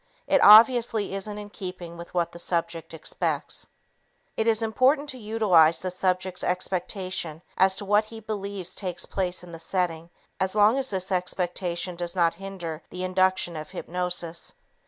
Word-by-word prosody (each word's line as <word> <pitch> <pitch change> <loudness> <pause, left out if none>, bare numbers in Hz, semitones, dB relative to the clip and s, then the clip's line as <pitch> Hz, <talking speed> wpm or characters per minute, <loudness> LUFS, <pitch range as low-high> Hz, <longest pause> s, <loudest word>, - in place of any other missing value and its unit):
It 285 -1 +3
obviously 220 -1 +7
isn't 205 +2 -4
in 205 0 -8
keeping 180 -4 -7
with 170 0 -10
what 170 -1 +1
the 170 - -11
subject 170 -1 -2
expects. 160 -1 -2 0.7
It 220 - 0
is 225 0 +3
important 265 +6 +2
to 260 - -6
utilize 205 -8 +4
the 185 - -2
subject's 185 0 -1
expectation 185 -2 -2
as 190 0 +4
to 200 - -5
what 205 +2 +3
he 225 +1 -10
believes 200 -4 -5
takes 180 -3 -3
place 180 -2 -2
in 175 - -11
the 165 - -8
setting 170 -1 -2 0.3
as 190 +1 -1
long 215 +5 +5
as 265 - -2
this 190 -1 -3
expectation 180 -1 -2
does 175 +1 -4
not 170 -2 +3
hinder 180 -5 -6
the 180 0 -6
induction 185 -1 +1
of 155 -1 -6
hypnosis. 175 - -4
185 Hz, 160 wpm, -26 LUFS, 175-210 Hz, 0.7 s, obviously